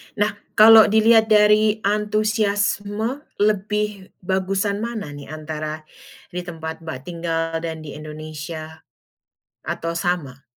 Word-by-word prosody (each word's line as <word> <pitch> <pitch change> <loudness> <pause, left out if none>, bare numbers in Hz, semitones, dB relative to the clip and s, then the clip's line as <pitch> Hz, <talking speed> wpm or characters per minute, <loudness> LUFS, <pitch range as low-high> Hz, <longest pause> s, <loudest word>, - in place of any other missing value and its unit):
Nah, 210 0 +1 0.2
kalau 220 0 +9
dilihat 220 +1 +5
dari 215 0 +4
antusiasme, 210 +2 0 0.2
lebih 210 -1 -1
bagusan 195 +2 -1
mana 220 -9 -4
nih, 145 -1 -10
antara 155 0 -6 0.5
di 180 - -4
tempat 160 -2 -6
Mbak 160 -6 -6
tinggal 165 -1 -2
dan 160 -1 -5
di 150 0 -8
Indonesia, 155 +1 -8 0.8
atau 165 0 -4
sama? 165 -6 -3
190 Hz, 110 wpm, -22 LUFS, 160-210 Hz, 0.8 s, kalau